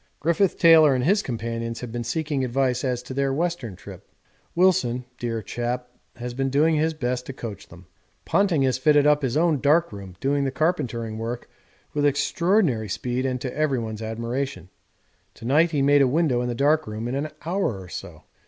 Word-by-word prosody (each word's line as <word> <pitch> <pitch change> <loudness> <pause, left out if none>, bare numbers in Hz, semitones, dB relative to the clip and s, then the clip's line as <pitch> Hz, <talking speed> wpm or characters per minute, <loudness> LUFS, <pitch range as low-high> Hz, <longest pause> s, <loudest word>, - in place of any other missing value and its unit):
Griffith 170 +4 +1
Taylor 160 -4 +7
and 125 - 0
his 200 +8 +3
companions 115 - -4
have 125 -2 -6
been 120 0 -3
seeking 145 +3 -2
advice 130 0 0
as 125 -2 -1
to 130 - -7
their 135 0 0
Western 155 - -2
trip. - - -12 0.5
Wilson, 170 -9 +2
dear 115 -2 -3
chap, 125 +1 -3 0.3
has 120 0 -6
been 135 +2 -1
doing 150 +4 +3
his 160 +1 +1
best 125 -3 -2
to 135 - -5
coach 110 -6 -8
them. 85 +2 -15 0.4
Ponting 185 -8 +2
has 130 -1 +1
fitted 145 +1 +4
up 150 0 +4
his 130 0 -1
own 160 -3 +2
dark 155 +4 +3
room 95 -3 -9
doing 140 +1 +1
the 135 - 0
carpentering 130 -8 -1
work 115 +2 -5 0.5
with 145 - 0
extraordinary 145 - +1
speed 125 +6 -2
and 125 -1 -2
to 125 -1 -4
everyone's 120 -8 -1
admiration. 115 -3 -4 0.7
To - - -11
night 155 +7 +4
he 145 -4 0
made 145 +1 +5
a 135 - +5
window 135 -3 +1
in 125 - -2
the 120 - -2
dark 150 +4 +2
room 110 +2 -4
in 120 - -3
an 145 +3 -2 0.2
hour 170 - -1
or 95 - -10
so. - - -9
130 Hz, 190 wpm, -24 LUFS, 120-155 Hz, 0.7 s, Taylor